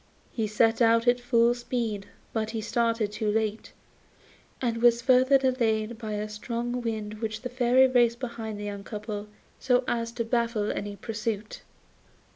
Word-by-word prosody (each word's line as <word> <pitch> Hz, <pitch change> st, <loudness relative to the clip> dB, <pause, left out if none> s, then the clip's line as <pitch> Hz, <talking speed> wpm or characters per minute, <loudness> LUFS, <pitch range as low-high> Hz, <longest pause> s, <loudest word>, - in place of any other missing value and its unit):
He 225 Hz, -3 st, -1 dB
set 225 Hz, +2 st, +2 dB
out 230 Hz, +1 st, +4 dB
at 245 Hz, 0 st, +4 dB
full 240 Hz, -1 st, +3 dB
speed; 235 Hz, -4 st, -3 dB, 0.3 s
but 220 Hz, -1 st, -1 dB
he 225 Hz, 0 st, -3 dB
started 230 Hz, -1 st, 0 dB
too 215 Hz, 0 st, -2 dB
late, 220 Hz, 0 st, -2 dB, 0.9 s
and 230 Hz, -2 st, -1 dB
was 235 Hz, -1 st, +5 dB
further 255 Hz, +2 st, +5 dB
delayed 235 Hz, -4 st, 0 dB
by 220 Hz, -2 st, -4 dB
a 210 Hz, 0 st, -2 dB
strong 235 Hz, +3 st, -3 dB
wind 215 Hz, -2 st, -4 dB
which 220 Hz, -1 st, -3 dB
the 250 Hz, -, -3 dB
Fairy 250 Hz, +1 st, +4 dB
raised 240 Hz, -2 st, +3 dB
behind 225 Hz, -4 st, -5 dB
the 205 Hz, -, -5 dB
young 200 Hz, -1 st, -5 dB
couple 210 Hz, 0 st, -6 dB, 0.3 s
so 250 Hz, -1 st, +2 dB
as 230 Hz, -1 st, -1 dB
to 235 Hz, -1 st, -2 dB
baffle 230 Hz, -3 st, 0 dB
any 205 Hz, 0 st, -4 dB
pursuit. 215 Hz, 0 st, -4 dB
230 Hz, 160 wpm, -27 LUFS, 215-240 Hz, 0.9 s, was